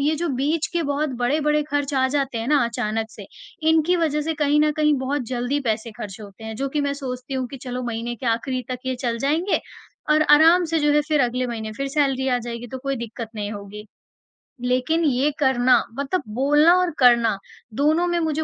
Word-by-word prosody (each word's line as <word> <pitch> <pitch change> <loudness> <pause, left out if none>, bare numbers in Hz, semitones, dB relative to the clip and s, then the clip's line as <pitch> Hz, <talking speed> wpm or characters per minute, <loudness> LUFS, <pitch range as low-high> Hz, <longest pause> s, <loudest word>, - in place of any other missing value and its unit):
ये 300 +3 +2
जो 340 +1 -2
बीच 290 +4 0
के 340 -1 0
बहुत 285 +1 -1
बड़े-बड़े 300 +4 +1
खर्च 290 -1 -2
आ 260 0 +3
जाते 270 -4 -1
हैं 225 - -4
ना 290 -5 +4
अचानक 220 -1 -2
से, - - -11 0.4
इनकी 320 +3 +3
वजह 305 -3 0
से 320 +1 -2
कहीं 295 0 +2
न 305 0 +3
कहीं 300 -1 +3
बहुत 265 +1 -2
जल्दी 255 +3 -1
पैसे 230 -2 -2
खर्च 200 0 -7
होते 205 +1 -12
हैं 220 0 -5
जो 275 +2 -2
कि 295 +2 -1
मैं 285 0 0
सोचती 260 -1 -6
हूँ 260 -1 -1
कि 275 - -8
चलो 250 -1 -4
महीने 235 0 -3
के 255 - -7
आखिरी 250 +3 -1
तक 250 - -3
ये 260 - 0
चल 235 -3 -1
जाएँगे 315 - +1 0.5
और 305 0 +5
आराम 325 +4 +7
से 330 0 0
जो 295 0 +3
है 300 - +4
फिर 300 -2 +2
अगले 250 +1 0
महीने 220 -2 -5
फिर 275 +5 -4
सैलरी 270 -2 0
आ 250 -1 +2
जाएगी 235 0 -6
तो 260 - -6
कोई 275 +1 -3
दिक्कत 230 -1 -6
नहीं 205 -1 -4
होगी, 205 +1 -8 0.8
लेकिन 255 +7 +1
ये 280 +1 +2
करना 260 -3 +4 0.2
मतलब 280 +4 -1
बोलना 295 +6 +5
और 360 -1 +1
करना 235 -5 +5 0.4
दोनों 315 +5 +2
में 345 0 0
मुझे 315 -1 -1
270 Hz, 215 wpm, -22 LUFS, 240-300 Hz, 0.8 s, आराम